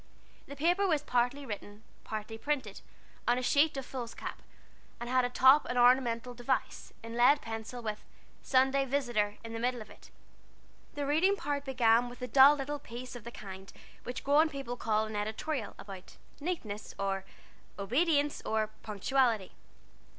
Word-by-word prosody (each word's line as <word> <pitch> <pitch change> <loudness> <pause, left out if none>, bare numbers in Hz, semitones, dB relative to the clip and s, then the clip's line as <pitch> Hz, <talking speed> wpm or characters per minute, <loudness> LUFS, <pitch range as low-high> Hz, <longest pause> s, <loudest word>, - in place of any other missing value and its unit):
This 280 - -9
paper 350 +7 +2
was 310 -5 +1
partly 250 +2 0
written, 205 -2 -7 0.2
partly 215 +1 -5
printed, 290 +4 -3 0.5
on 240 - +5
a - - +1
large 250 0 -2
sheet 290 +2 +3
of 270 - -4
foolscap, 245 -3 -6 0.6
and 240 - -5
had 255 +1 +3
at 245 0 -3
the - - -5
top 265 +3 +7
an 245 - -2
ornamental 245 -1 +3
device, 245 +2 -2
in 230 0 -7
lead 250 +5 +5
pencil, 225 +1 -6
with 215 -1 -4 0.4
"Sunday 265 +1 +3
Visitor" 240 -7 0
in 225 - -7
the 225 - -4
middle 245 +1 0
of 215 - -10
it. - - -16 0.9
The 290 -1 -2
reading 325 +8 +3
part 285 -6 -3
began 245 -2 +3
with 245 - -12
a - - -2
dull 270 +4 +7
little 290 +1 -4
piece 250 0 -8
of 235 -2 -10
the 235 - -7
kind 195 -3 -9 0.3
which 245 +1 -6
grown 300 +3 +4
people 275 -4 -5
call 220 -2 0
an 215 0 -7
editorial, 220 +4 -3
about 195 -2 -11 0.2
"Neatness," 280 - -4
or 195 -1 -1 0.5
"Obedience," 290 - +1
or 215 -1 -1
"Punctuality." 220 0 0
245 Hz, 165 wpm, -31 LUFS, 220-280 Hz, 0.9 s, top